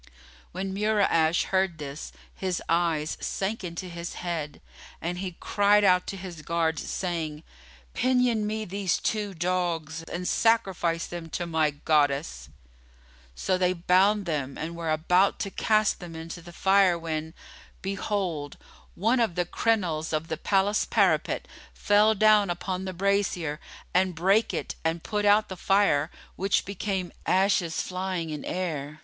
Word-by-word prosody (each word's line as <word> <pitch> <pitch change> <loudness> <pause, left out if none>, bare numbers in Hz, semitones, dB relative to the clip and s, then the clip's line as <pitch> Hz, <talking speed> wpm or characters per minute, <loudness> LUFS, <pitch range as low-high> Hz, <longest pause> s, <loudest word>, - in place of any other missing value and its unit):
When 190 +1 -4
Mura'ash 195 -6 +2
heard 190 -3 +1
this, 145 0 -7 0.2
his 185 -2 -2
eyes 165 -2 0
sank 200 +2 -2
into 170 +1 -5
his 170 0 -6
head[FN#29] 165 -4 -4 0.4
and 175 +2 -3
he 185 -2 -5
cried 205 0 +3
out 180 -2 +4
to 195 - -4
his 180 -4 -8
guards, 165 -1 -1
saying, 160 -4 -3 0.5
"Pinion 250 -4 +2
me 215 0 -2
these 195 -1 -1
two 210 -3 -2
dogs 165 -2 -1
and 180 +1 -3
sacrifice 190 -7 +1
them 170 -2 -7
to 175 - -3
my 160 -2 +2
Goddess." 145 - 0 0.9
So 185 - 0
they 180 0 +3
bound 190 +4 +3
them 145 -5 -3
and 165 +2 -5
were 165 -1 -4
about 180 +5 +3
to 195 - -3
cast 215 0 +2
them 175 -2 -9
into 165 +2 -7
the 175 +1 -12
fire 190 0 +4
when, 160 -1 -4 0.5
behold, 190 -6 -2 0.4
one 230 +7 +2
of 220 -7 +1
the 175 -1 0
crenelles 175 -7 0
of 155 +1 -2
the 160 - -2
palace 200 +4 +2
parapet - - +1 0.3
fell 210 +1 +4
down 215 -1 +5
upon 185 +2 -3
the 185 - -4
brazier 180 -5 0 0.3
and 185 -1 +2
brake 195 +7 +3
it - - -3
and 160 +1 -1
put 210 -1 -1
out 205 +1 +5
the 190 - -6
fire, 180 -6 +2 0.3
which 195 +1 +1
became 195 -2 -3 0.2
ashes 185 -3 +2
flying 185 -3 -3
in 150 - -5
air. 155 -5 -4
180 Hz, 145 wpm, -27 LUFS, 165-200 Hz, 0.9 s, down